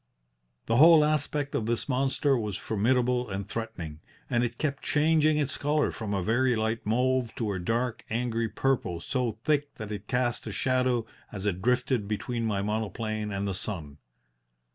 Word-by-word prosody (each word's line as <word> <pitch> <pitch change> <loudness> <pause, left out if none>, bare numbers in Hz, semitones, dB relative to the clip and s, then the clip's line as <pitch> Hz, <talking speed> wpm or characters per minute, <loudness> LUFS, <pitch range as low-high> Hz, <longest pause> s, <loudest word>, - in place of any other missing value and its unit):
"The 115 - +1
whole 160 +1 +8
aspect 150 -1 0
of 110 - -1
this 115 0 0
monster 135 +1 +2
was 105 -5 -2
formidable 125 +3 +1
and 95 0 -4
threatening, 90 -10 -5 0.3
and 120 0 +2
it 120 0 -2
kept 140 -3 -2
changing 155 0 +3
its 145 -2 0
colour 150 +1 +1
from 110 -3 -5
a 100 -2 0
very 120 +4 +2
light 110 +1 -1
mauve 125 +1 +1
to 110 -4 -1
a 95 - -3
dark, 115 +5 -1
angry 115 0 -1
purple 125 -10 0
so 125 +4 -1
thick 145 -1 0
that 110 -1 -7
it 105 0 -6
cast 125 -1 -1
a - - -3
shadow 130 -2 +1 0.3
as 100 -1 -6
it 95 -3 -1
drifted 125 -1 +1
between 115 +2 -2
my 100 -2 0
monoplane 110 0 -2
and 100 0 -2
the 100 - -1
sun. 80 -7 -5
120 Hz, 170 wpm, -28 LUFS, 105-130 Hz, 0.3 s, whole